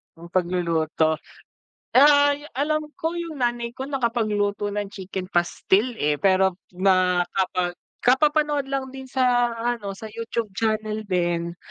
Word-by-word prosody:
Ang 170 +1 -12
pagluluto. 165 -3 +1 0.8
Ay, 285 +1 +5
alam 305 +3 0
ko 325 +2 -3
yung 330 -5 -5
nanay 240 -1 -1
ko 265 +1 -6
nakapagluto 215 -6 0
ng 205 0 -2
chicken 190 -1 -6
pastil, 195 +7 +1
eh, 150 0 0
pero 190 -1 +3 0.2
ma 185 -2 +3
kapag 180 -2 0 0.3
kapapanood 295 +1 +3
lang 270 -1 -1
din 265 -1 -8
sa 245 -2 +2
ano, 230 -3 -2
sa 220 - -8
YouTube 230 -1 -4
channel 215 0 -1
din. 175 -2 -1
215 Hz, 130 wpm, -24 LUFS, 185-265 Hz, 0.8 s, Ay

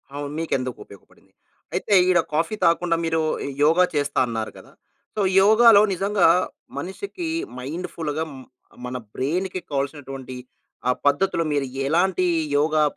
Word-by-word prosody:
అవును 145 0 -5
మీకు 165 - -3
ఎందుకు 130 -1 -5
ఉపయోగపడింది. 100 - -19 0.4
అయితే - - -1 0.2
ఈడ 180 - +4
కాఫీ 165 +6 0
తాగకుండా 170 0 +3
మీరు 160 0 0 0.2
యో - - -4
యోగ 160 +3 +4 0.2
చేస్తా 145 -1 0
అన్నారు 110 -2 -3
కదా! - - -15 0.4
సో, 215 - 0 0.2
యోగాలో 220 +1 +7
నిజంగా 195 +1 +2 0.5
మనిషికి 340 - -5 0.3
మైండ్ 160 +8 -5
ఫుల్‌గా 155 -1 -3
మ - - -10 0.5
మన 125 0 -4 0.2
బ్రెయిన్‌కి 180 +7 -2
కావాల్సినటువంటి, 135 -2 -4 0.5
ఆ - - +6
పద్ధతిలో 165 +4 +2
మీరు 145 -1 0 0.2
ఎలాంటి 180 +4 +2 0.3
యోగా 155 +1 +2
160 Hz, 135 wpm, -23 LUFS, 140-185 Hz, 0.5 s, యోగాలో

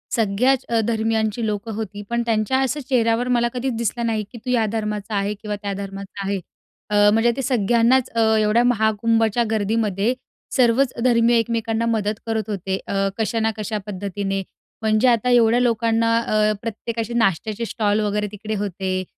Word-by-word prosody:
सगळ्याचं 235 +3 +1
अ, - - +4
धर्मीयांची 225 0 0
लोकं 210 +1 -3
होती. 205 -2 -5
पण 235 0 0
त्यांच्या 225 +3 +1
असं 270 +2 0
चेहऱ्यावर 235 -1 +2
मला 240 0 +2
कधीचं 250 0 -2
दिसलं 235 +1 -1
नाही 220 -2 0
की 245 - -9
तू - - -3
या 235 -3 +2
धर्माचा 210 -1 -3
आहे 200 +1 0
किंवा 210 0 -5
त्या 200 -1 -3
धर्माचा 195 0 -7
आहे. 200 -1 -1 0.5
अ, 205 0 +5
म्हणजे 225 +2 +3
ते - - -1
सगळ्यांनाचं 240 0 +2
अ, 220 0 +3
एवढ्या 215 +3 +3
महाकुंभच्या 225 0 +2
गर्दीमध्ये 215 0 0 0.4
सर्वचं 245 0 +2
धर्मीय 235 -1 +4
एकमेकांना 230 0 -1
मदत 215 -2 0
करत 220 -2 -2
होते. 190 -2 -2
अ, 195 0 0
कशा 225 +1 -1
ना 225 0 +1
कशा 215 0 -3
पद्धतीने. 195 0 -3 0.4
म्हणजे 220 +2 +2
आता 240 0 +3
एवढ्या 240 -1 +4
लोकांना 230 -1 +2
अ, 215 -2 +1
प्रत्येकाचे 230 +1 -4
नाश्त्याचे 220 0 0
स्टॉल 210 -2 0
वगैरे 210 0 0
तिकडे 215 +1 -5
होते. 190 -1 -2
220 Hz, 165 wpm, -21 LUFS, 210-235 Hz, 0.5 s, अ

